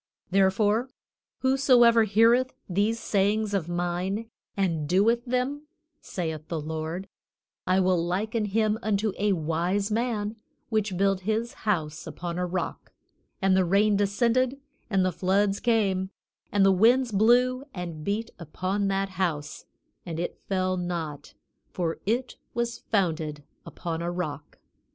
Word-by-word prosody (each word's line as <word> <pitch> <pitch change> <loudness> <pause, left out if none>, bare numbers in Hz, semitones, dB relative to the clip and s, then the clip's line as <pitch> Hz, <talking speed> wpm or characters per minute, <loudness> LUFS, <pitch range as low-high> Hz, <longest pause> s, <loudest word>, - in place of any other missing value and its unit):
"Therefore, 205 +5 +3 0.5
whosoever 250 -4 +5
heareth 230 +5 +4
these 205 +5 +1
sayings 205 0 +1
of 180 -4 -1
mine 180 +6 -2 0.3
and 165 -6 0
doeth 225 +6 +3
them," 260 +4 -2 0.3
saith 160 -4 -4
the 165 - -3
Lord, 160 +4 -4 0.6
"I 185 +1 +3
will 180 -2 +2
liken 210 +5 -1
him 215 +1 +1
unto 210 -1 0
a 205 0 +2
wise 175 +5 -1
man 220 -2 -1 0.3
which 215 -4 0
built 195 0 +2
his 220 +4 -1 0.2
house 160 -5 -1
upon 170 +2 -5
a 180 - 0
rock; 185 +1 -4 0.5
and 190 -1 +4
the 190 - +4
rain 200 +4 +3
descended, 235 +6 +1 0.3
and 190 -3 +2
the 185 - +1
floods 195 +3 +1
came, 195 -5 +1 0.4
and 200 -1 +4
the 195 - +6
winds 235 +6 +4
blew 245 +5 +3
and 170 -6 -6
beat 210 +5 -2
upon 185 +5 -2
that 195 0 0
house; 170 -6 -3 0.4
and 165 -2 -5
it 175 - -3
fell 185 -1 -1
not, 170 -5 -4 0.3
for 170 -3 -2
it 245 +4 -1 0.2
was 235 0 -2
founded 160 -7 0 0.2
upon 165 -2 -4
a 170 - -2
rock. 150 -5 -5
195 Hz, 135 wpm, -27 LUFS, 175-220 Hz, 0.6 s, the